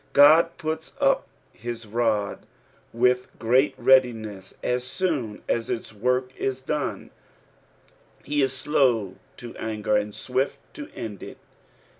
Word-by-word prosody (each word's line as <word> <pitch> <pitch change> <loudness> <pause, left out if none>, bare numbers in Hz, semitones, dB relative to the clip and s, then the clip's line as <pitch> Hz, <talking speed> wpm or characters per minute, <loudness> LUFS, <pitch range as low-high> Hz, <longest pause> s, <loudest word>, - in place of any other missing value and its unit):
God 155 +4 +7
puts 160 0 -4
up - - +2 0.3
his 115 0 -6
rod 110 -2 -1 0.4
with 125 +2 +2
tfreat 125 +5 +3
readiness 110 -7 +2
as 125 0 0
soon 130 - -2
as 115 0 -1
its 115 - -4
work 125 +4 0
is 130 -1 -2
done; 145 +2 -3 1.1
he 145 0 0
is 135 -1 +2
slow 125 -7 +1 0.2
to 120 -2 -9
anger 105 -1 -1
and 105 0 0
swift 130 +2 -1 0.2
to 295 0 -8
end 105 -4 -6
it. - - -9
125 Hz, 125 wpm, -25 LUFS, 110-135 Hz, 1.1 s, God